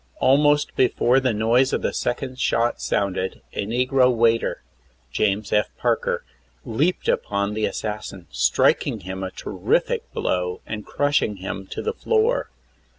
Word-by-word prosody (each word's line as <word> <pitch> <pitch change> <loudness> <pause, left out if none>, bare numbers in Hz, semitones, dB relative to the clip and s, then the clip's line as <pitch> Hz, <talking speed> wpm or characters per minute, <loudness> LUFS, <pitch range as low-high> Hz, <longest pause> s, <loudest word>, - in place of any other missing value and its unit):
Almost 145 +2 +3
before 125 0 +3
the 130 -2 +1
noise 115 +5 +2
of - - -1
the - - 0
second 130 +1 -3
shot 120 +1 +1
sounded 95 -1 -1
a 100 - -3
negro 125 +2 +3
waiter, 115 -1 +1 0.5
James 105 0 0
F. 105 -1 +2
Parker, - - 0 0.4
leaped 150 +11 0
upon 100 0 0
the 110 0 0
assassin, 105 -4 -5
striking 65 - +2
him 95 +1 -6
a 95 - -3
terrific - - -1
blow 90 0 -2
and 105 -1 -6
crushing 145 -7 +1
him 95 0 -6
to - - -5
the 450 - -1
floor. 460 +2 +1
115 Hz, 140 wpm, -23 LUFS, 100-130 Hz, 0.5 s, Almost